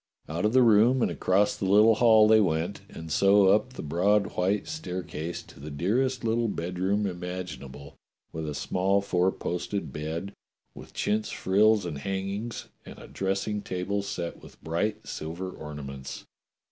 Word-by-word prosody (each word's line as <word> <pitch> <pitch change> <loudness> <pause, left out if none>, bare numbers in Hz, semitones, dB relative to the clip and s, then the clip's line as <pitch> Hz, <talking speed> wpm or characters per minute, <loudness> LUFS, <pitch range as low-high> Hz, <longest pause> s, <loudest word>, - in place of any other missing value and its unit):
Out 85 +6 -2
of 105 - +2
the 130 -1 +6
room 115 +3 +5
and - - +1
across 100 +2 +2
the 105 - -4
little 105 +4 +6
hall 110 -1 +6
they 110 0 +6
went, 85 +1 -1
and 80 0 -9
so 100 +2 +5
up 105 +6 +2
the - - -7
broad 100 +7 +1
white 95 +3 0
staircase 90 - -5
to - - -16
the 75 +2 -7
dearest 120 - 0
little 115 +1 +1
bedroom 95 +2 -1
imaginable, 90 -7 -6 0.4
with 80 -1 -4
a 75 - -5
small 95 +5 +1
four 95 -1 +1
posted 95 +3 -4
bed 80 +6 -4 0.4
with - - -13
chintz 105 +1 0
frills 105 +1 +3
and 75 -5 -4
hangings, 100 +7 -4 0.2
and - - -11
a - - -11
dressing 100 +2 -2
table 95 +2 -2
set 85 -3 -5
with - - -15
bright 85 +7 -2
silver 85 +4 -5
ornaments. 70 -4 -8
95 Hz, 160 wpm, -27 LUFS, 85-105 Hz, 0.4 s, the